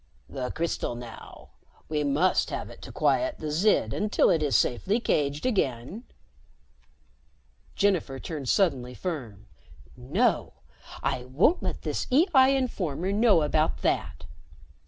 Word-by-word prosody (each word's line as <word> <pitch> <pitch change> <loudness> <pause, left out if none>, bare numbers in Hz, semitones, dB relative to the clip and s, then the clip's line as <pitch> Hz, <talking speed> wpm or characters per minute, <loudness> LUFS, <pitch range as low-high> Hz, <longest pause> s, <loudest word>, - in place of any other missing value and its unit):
"The 125 -2 -4
crystal 165 -7 -2
now. 120 -1 -11 0.4
We 150 -1 -1
must 145 +6 +2
have - - -5
it - - -14
to - - -9
quiet 320 -1 +1
the 155 -1 -5
Zid 160 - +2
until 210 0 +2
it 160 - +2
is 145 -3 +3
safely 195 - +1
caged 145 -9 -1
again." 185 - -1 1.7
Jennifer 180 -9 +1
turned 145 -5 -5
suddenly 130 -10 +1
firm. 120 - -6 0.5
"No. 125 +2 0 0.5
I 125 -1 -1
won't 155 - +2
let - - -4
this - - -3
EI 275 -3 +5
informer 185 - -2
know 205 -5 +4
about 155 +1 0
that." - - -1
155 Hz, 125 wpm, -27 LUFS, 130-205 Hz, 1.7 s, EI